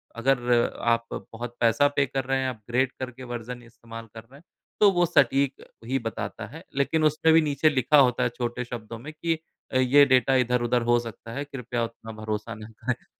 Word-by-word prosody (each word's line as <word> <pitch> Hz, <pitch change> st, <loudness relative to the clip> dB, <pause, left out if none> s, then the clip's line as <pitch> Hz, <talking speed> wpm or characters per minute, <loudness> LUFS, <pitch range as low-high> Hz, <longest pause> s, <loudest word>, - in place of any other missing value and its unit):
अगर 120 Hz, -1 st, +1 dB, 0.2 s
आप 115 Hz, 0 st, -1 dB, 0.3 s
बहुत 120 Hz, +1 st, -6 dB
पैसा 115 Hz, +5 st, +4 dB
पे 140 Hz, -, +3 dB
कर 135 Hz, 0 st, -3 dB
रहे 135 Hz, +1 st, 0 dB
हैं, 130 Hz, -, 0 dB
अपग्रेड 125 Hz, +3 st, -1 dB
करके 130 Hz, 0 st, -6 dB
वर्ज़न 120 Hz, +1 st, -6 dB
इस्तेमाल 115 Hz, 0 st, -11 dB
कर 110 Hz, -, -9 dB
रहे 125 Hz, +5 st, -20 dB
हैं, -, -, -23 dB, 0.4 s
तो 205 Hz, -1 st, +6 dB
वो 175 Hz, -2 st, +2 dB
सटीक 140 Hz, -4 st, +2 dB, 0.2 s
ही 135 Hz, +2 st, 0 dB
बताता 115 Hz, -2 st, -5 dB
है। -, -, -10 dB
लेकिन 155 Hz, +3 st, +1 dB
उसमें 155 Hz, +1 st, +3 dB
भी 165 Hz, -, +6 dB
नीचे 150 Hz, 0 st, +2 dB
लिखा 145 Hz, +1 st, +3 dB
होता 125 Hz, -2 st, +4 dB
है 125 Hz, -, +2 dB
छोटे 120 Hz, 0 st, -2 dB
शब्दों 115 Hz, -1 st, -7 dB
में 145 Hz, +6 st, -8 dB
कि 165 Hz, +1 st, -1 dB, 0.4 s
अ, -, -, +3 dB
ये 130 Hz, +3 st, +6 dB
डाटा 130 Hz, 0 st, +3 dB
इधर-उधर 125 Hz, -1 st, +2 dB
हो 120 Hz, -, +5 dB
सकता 115 Hz, -1 st, -9 dB
है, 140 Hz, +3 st, -3 dB
कृपया 125 Hz, -4 st, -4 dB
उतना 115 Hz, -1 st, -7 dB
भरोसा 110 Hz, +1 st, -4 dB
ना 110 Hz, 0 st, -10 dB, 0.2 s
करें 125 Hz, 0 st, -2 dB
125 Hz, 200 wpm, -26 LUFS, 115-135 Hz, 0.4 s, तो